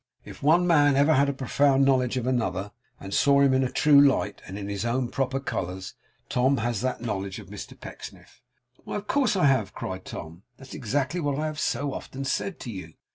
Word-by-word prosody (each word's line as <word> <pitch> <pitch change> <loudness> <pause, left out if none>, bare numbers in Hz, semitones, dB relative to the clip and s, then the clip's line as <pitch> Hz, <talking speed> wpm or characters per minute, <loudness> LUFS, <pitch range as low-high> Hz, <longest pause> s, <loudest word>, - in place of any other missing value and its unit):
If - - -11
one 165 +5 +4
man 145 -5 +4
ever 145 +3 +4
had 140 -1 +3
a - - +2
profound 135 +1 +2
knowledge 130 -2 +2
of 125 - -2
another, 115 -6 -1 0.3
and 95 0 -8
saw 140 0 +4
him 140 -1 +4
in 130 0 +3
a 130 - 0
true 145 -2 +6
light, 135 -7 +2
and 95 - -7
in 100 -1 -5
his 100 0 -3
own 120 +1 -1
proper 135 +1 -1
colours, 95 -7 -4 0.3
Tom 130 +2 +2
has 120 -2 -1
that 130 -2 -2
knowledge 100 -4 -3
of - - -11
Mr - - -9
Pecksniff.' - - -11 0.4
'Why, - - -6
of 210 - -4
course 260 -3 +1
I 180 - +3
have,' 130 -8 +2
cried 95 0 -6
Tom. 80 +3 -8 0.2
'That's 135 0 -12
exactly 140 +8 -1
what 145 -4 -1
I 155 - -1
have 155 -1 -4
so 140 +1 -1
often 135 +1 -6
said 190 +7 -2
to 120 - -6
you. 90 -6 -8
130 Hz, 215 wpm, -26 LUFS, 110-140 Hz, 0.4 s, true